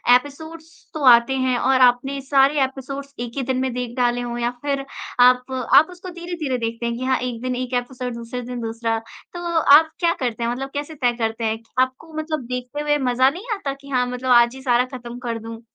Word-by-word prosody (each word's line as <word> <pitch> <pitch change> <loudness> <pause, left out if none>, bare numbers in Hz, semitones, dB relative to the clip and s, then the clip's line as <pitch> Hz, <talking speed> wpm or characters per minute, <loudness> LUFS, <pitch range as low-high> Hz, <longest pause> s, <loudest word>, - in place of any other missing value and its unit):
Episodes 315 +5 -4 0.3
तो 310 -3 -4
आते 235 +2 +6
हैं 255 -1 +1
और 265 +1 +3
आपने 255 +3 +3
सारे 275 +1 +3
एपिसोड्स 275 +1 -5
1 240 -1 -4
ही - - 0
दिन 260 0 -1
में 260 0 -1
देख 245 -1 -4
डाले 245 -1 +1
हों 240 0 -4
या 240 0 0
फिर 280 -1 -2 0.3
आप 250 +1 +5 0.2
आप 315 - +8
उसको 360 +1 -9
धीरे-धीरे 340 -6 -4
देखते 230 0 -3
हैं 235 0 -1
कि 255 - -5
हाँ, 260 0 +2
1 245 -2 -4
दिन 255 0 -2
1 255 0 -4
एपिसोड 250 0 -6
दूसरे 235 +2 -6
दिन 245 0 -6
दूसरा, 225 0 -2 0.4
तो 350 - -6 0.2
आप 315 +1 +6
क्या 340 -1 +3
करते 240 -3 -2
हैं? 235 - 0
मतलब 270 +3 -4
कैसे 290 +2 -5
तय 245 -4 +1
करते 225 0 -2
हैं 220 0 0
कि - - -33
आपको 260 +5 -3
मतलब 310 -4 -3
देखते 250 +3 -4
हुए 295 0 +2
मज़ा 255 +2 +4
नहीं 365 - -9
आता 290 -9 -4
कि 280 - -13
हाँ, 250 -2 +1
मतलब 250 +1 -4
आज 240 0 +5
ही 265 - -10
सारा 250 -1 +2
ख़त्म 240 0 -9
कर 235 -2 -4
दूँ? 225 0 -9
255 Hz, 225 wpm, -22 LUFS, 240-280 Hz, 0.4 s, आप